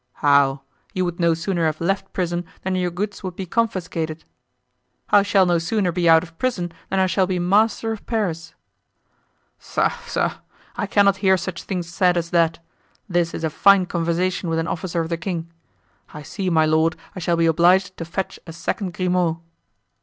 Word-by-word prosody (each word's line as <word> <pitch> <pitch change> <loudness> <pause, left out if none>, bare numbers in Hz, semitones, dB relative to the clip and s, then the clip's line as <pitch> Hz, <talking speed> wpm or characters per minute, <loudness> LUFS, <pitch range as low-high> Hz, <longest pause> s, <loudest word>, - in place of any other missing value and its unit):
"How? 140 -1 +3 0.3
you 185 -1 +1
would 175 0 -4
no 170 -1 +3
sooner 170 0 0
have 155 0 -2
left 195 +4 -1
prison 175 -1 -2 0.2
than 190 - -1
your 180 -1 0
goods 195 +3 -4
would 185 -2 -5
be 190 - -5
confiscated." 170 -7 -2 0.9
"I 205 - +7
shall 200 -1 +3
no 175 -1 +2
sooner 180 +2 0
be 170 -1 +1
out 160 0 +6
of 165 -2 -14
prison 185 -10 -1 0.2
than 190 - 0
I 190 - +4
shall 185 0 +1
be 185 -1 -1
master 210 +5 +2
of 220 - -7
Paris." 165 -8 -2 1.0
"Pshaw! - - 0
pshaw! 475 0 -3 0.4
I - - -2
cannot 200 -1 +4
hear 190 -1 +3
such 180 0 -5
things 180 -3 -4
said 180 +1 +2
as 170 0 -2
that; 165 -1 +2 0.5
this 175 -3 0
is - - -6
a 160 - 0
fine 195 +3 +5
conversation 175 +1 -1
with 165 - 0
an 165 +1 -1
officer 170 0 -2
of 165 - -4
the 170 - -1
king! 170 -2 -4 0.6
I 150 -1 -9
see, 185 +5 -3
my 160 -2 +3
lord, 160 +1 +2 0.2
I - - -5
shall 170 -1 +1
be 165 - +3
obliged 180 +3 +3
to - - -4
fetch 185 +3 -4
a 165 - -8
second 180 +2 -3
Grimaud!" 180 -3 +1
175 Hz, 190 wpm, -22 LUFS, 165-190 Hz, 1.0 s, I